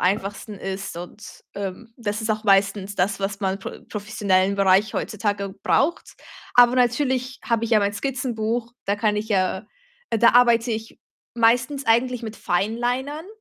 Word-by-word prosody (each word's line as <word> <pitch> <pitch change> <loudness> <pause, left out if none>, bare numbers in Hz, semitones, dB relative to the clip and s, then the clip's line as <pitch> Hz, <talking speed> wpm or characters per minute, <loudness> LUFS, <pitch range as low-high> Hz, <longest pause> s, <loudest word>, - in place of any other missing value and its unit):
einfachsten 200 +2 -1
ist 195 -2 -5
und, 180 +5 -10
ähm, 200 +4 -6
das 210 -2 -3
ist 220 - -1
auch 215 +1 -2
meistens 195 0 +2
das, 195 +1 0
was 195 +1 -3
man 190 -1 -1
pro 190 - -8
professionellen 200 -2 0
Bereich 195 +2 +3
heutzutage 205 -2 -2
braucht. 310 +5 +1 0.4
Aber 245 0 +7
natürlich 255 0 +1
habe 230 -1 0
ich 230 - -4
ja 215 - +6
mein 200 0 0
Skizzenbuch, 240 -1 -2
da 200 - +1
kann 210 0 +1
ich 215 +1 -3
ja 190 0 0 0.4
äh, 225 - +1
da 235 - +6
arbeite 235 -1 +4
ich 220 0 -6 0.4
meistens 245 +4 +2
eigentlich 245 +2 +2
mit 220 -1 -6
Finelinern, 245 - -1
215 Hz, 155 wpm, -23 LUFS, 200-240 Hz, 0.4 s, Aber